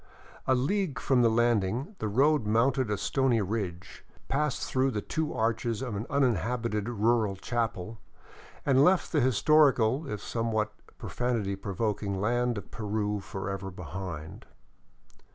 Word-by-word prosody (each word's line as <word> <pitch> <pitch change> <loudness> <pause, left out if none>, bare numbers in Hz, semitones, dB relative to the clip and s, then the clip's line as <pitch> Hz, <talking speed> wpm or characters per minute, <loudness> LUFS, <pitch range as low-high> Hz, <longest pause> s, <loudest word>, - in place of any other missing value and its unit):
A 130 - +4
league 165 +3 0
from 130 -2 +2
the 115 - +5
landing 120 - +1
the 110 - -2
road 135 +2 +3
mounted 120 +3 +2
a 105 - 0
stony 120 +4 +1
ridge, 95 -3 -4 0.3
passed 150 -1 0
through 130 +1 +1
the 105 -5 -2
two 160 -1 -2
arches 115 +1 -1
of 120 -5 -4
an 105 +5 -4
uninhabited 120 - 0
rural 110 -2 +1
chapel, 110 0 -3 0.7
and 135 0 +5
left 180 +3 +3
the 150 - +2
historical, 135 +1 +3
if 105 - -3
sometimes 110 0 -1 0.3
pro - - -8
fanity 115 -6 -1
provoking, 100 0 -2
land 120 +2 +1
of 100 - -8
Peru 105 -1 -2
forever 95 0 -5
behind. 90 -2 -7
115 Hz, 135 wpm, -29 LUFS, 100-130 Hz, 0.7 s, the